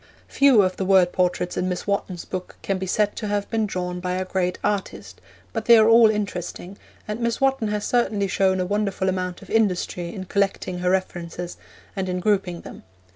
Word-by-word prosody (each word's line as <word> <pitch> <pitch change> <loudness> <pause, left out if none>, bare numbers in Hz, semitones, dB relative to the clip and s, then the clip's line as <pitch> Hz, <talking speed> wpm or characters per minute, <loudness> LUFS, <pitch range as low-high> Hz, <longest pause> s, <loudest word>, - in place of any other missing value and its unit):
Few 270 -7 +5
of 185 0 -1
the - - -1
word 190 -2 +4
portraits 180 -1 0
in 185 - 0
Miss 180 - -3
Wotton's 200 -3 -2
book 185 -1 -6
can 195 -1 -1
be 190 - -4
said 205 +2 +1
to 215 - -3
have 205 0 -1
been 220 -2 +1
drawn 180 -2 -3
by 180 0 -2
a 185 +1 -2
great 180 -1 -1
artist, 205 -2 -3 0.3
but - - -3
they 235 -1 +8
are 220 0 +6
all 230 -1 +7
interesting, 195 -2 -4 0.3
and 210 +1 -4
Miss 235 -1 -1
Wotton 270 -4 +1
has 210 0 -2
certainly 220 -5 +1
shown 190 0 +1
a 180 - 0
wonderful 195 -1 -1
amount 180 -1 -3
of - - -13
industry 180 -5 0
in 190 -1 -6
collecting 195 -1 -1
her 180 0 0
references 175 -2 -3 0.4
and 190 -1 -2
in 180 0 -1
grouping 190 -3 0
them. - - -11
190 Hz, 200 wpm, -23 LUFS, 180-210 Hz, 0.4 s, they